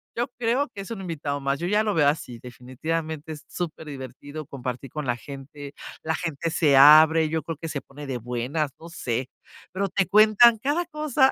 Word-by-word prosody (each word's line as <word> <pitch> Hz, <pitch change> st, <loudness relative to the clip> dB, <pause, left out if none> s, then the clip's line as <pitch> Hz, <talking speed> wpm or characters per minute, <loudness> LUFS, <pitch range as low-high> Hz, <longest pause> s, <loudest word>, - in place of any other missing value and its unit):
yo 240 Hz, +1 st, 0 dB
creo 245 Hz, +5 st, +1 dB
que 205 Hz, -4 st, -8 dB
es 195 Hz, -, -9 dB
un 220 Hz, -4 st, -5 dB
invitado 150 Hz, -5 st, -3 dB
más, 140 Hz, 0 st, -1 dB
yo 170 Hz, -, -4 dB
ya 210 Hz, +2 st, +3 dB
lo 210 Hz, -1 st, 0 dB
veo 150 Hz, -3 st, +4 dB
así 145 Hz, -5 st, -4 dB
definitivamente, 155 Hz, +6 st, -5 dB
es 150 Hz, -1 st, -9 dB
superdivertido 145 Hz, -3 st, -7 dB
compartir 130 Hz, -1 st, -6 dB
con 150 Hz, -1 st, -4 dB
la 120 Hz, -, +1 dB
gente, 140 Hz, +1 st, -10 dB, 0.3 s
la 160 Hz, -, 0 dB
gente 165 Hz, -1 st, -3 dB
se 150 Hz, -3 st, +3 dB
abre, 155 Hz, +3 st, +8 dB
yo 160 Hz, 0 st, -1 dB
creo 165 Hz, +2 st, -5 dB
que 165 Hz, +2 st, -6 dB
se 150 Hz, -, -3 dB
pone 145 Hz, +2 st, -11 dB
de 130 Hz, -3 st, -3 dB
buenas, 125 Hz, +6 st, -2 dB
no 165 Hz, -, -11 dB
sé, 130 Hz, -5 st, -3 dB, 0.4 s
pero 195 Hz, +2 st, -1 dB
te 195 Hz, +1 st, +1 dB
cuentan 215 Hz, +3 st, +6 dB
cada 295 Hz, +9 st, 0 dB
cosa, 300 Hz, -4 st, +2 dB
155 Hz, 195 wpm, -25 LUFS, 140-190 Hz, 0.4 s, abre